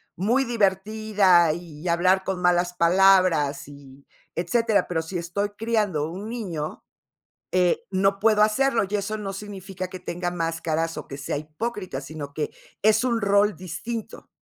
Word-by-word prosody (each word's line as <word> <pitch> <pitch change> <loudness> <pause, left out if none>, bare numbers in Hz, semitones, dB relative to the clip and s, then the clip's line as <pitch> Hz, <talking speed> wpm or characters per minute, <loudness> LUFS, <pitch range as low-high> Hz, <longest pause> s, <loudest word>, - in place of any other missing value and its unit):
muy 235 +9 +2
divertida, 200 -4 +3
y 165 -1 -9
hablar 185 +3 +3
con 190 -2 -3
malas 175 0 +2
palabras, 180 -5 +4
y 140 -1 -14 0.3
etcétera, 220 +5 +1
pero, 165 -2 -1
si 160 +3 -5
estoy 180 +4 -2
criando 210 -9 0
un 195 +6 -7
niño, 180 -11 -5 0.7
eh, 180 -1 +2
no 195 +1 +1
puedo 215 -1 +4
hacerlo, 225 +1 +3
y 210 - 0
eso 205 +2 -3
no 200 -2 -5
significa 195 -2 -7
que 185 - -8
tenga 175 0 -3
máscaras, 165 -1 -2
o 150 - -8
que 135 - -6
sea 140 +1 -3
hipócrita, 155 - -5
sino 145 -1 -8
que 150 - -2 0.3
es 215 +1 +4
un 240 -3 +1
rol 200 +1 +3
distinto. 210 +6 -6
185 Hz, 150 wpm, -24 LUFS, 165-210 Hz, 0.7 s, palabras